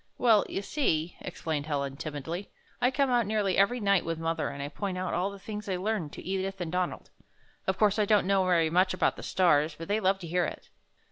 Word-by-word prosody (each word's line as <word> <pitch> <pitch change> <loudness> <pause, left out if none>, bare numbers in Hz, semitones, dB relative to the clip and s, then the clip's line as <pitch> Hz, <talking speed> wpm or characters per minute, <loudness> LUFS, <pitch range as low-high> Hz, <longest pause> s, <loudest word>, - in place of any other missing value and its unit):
"Well, 225 -4 +4
you 195 - -3
see," 170 - 0
explained 155 -2 -3
Helen, 140 -2 -2
timidly, 155 +6 -5 0.3
"I 250 - +4
come 270 0 +1
out 240 -4 +3
nearly 210 -3 +1
every 220 +6 +3
night 200 -3 +3
with 165 -1 -3
mother 165 0 -1
and 140 0 -6
I - - -3
point 190 +4 -4
out 185 0 -2
all 190 +2 0
the 200 - -9
things 210 +1 -7
I 185 - 0
learn 185 -3 -1
to - - -10
Edith 190 +1 -3
and 170 -3 -3
Donald. 180 0 -2 0.6
Of 190 0 +1
coui'se 210 0 +3
I 210 - +4
don't 205 -2 +3
know 195 0 +3
very 165 -3 +3
much 185 +2 +3
about - - +2
the - - -9
stars, 160 -4 +2
but 165 - -7
they 205 +2 +1
love 195 -1 +2
to 170 - -6
hear 175 +1 +1
it." - - -7
185 Hz, 230 wpm, -29 LUFS, 165-205 Hz, 0.6 s, Well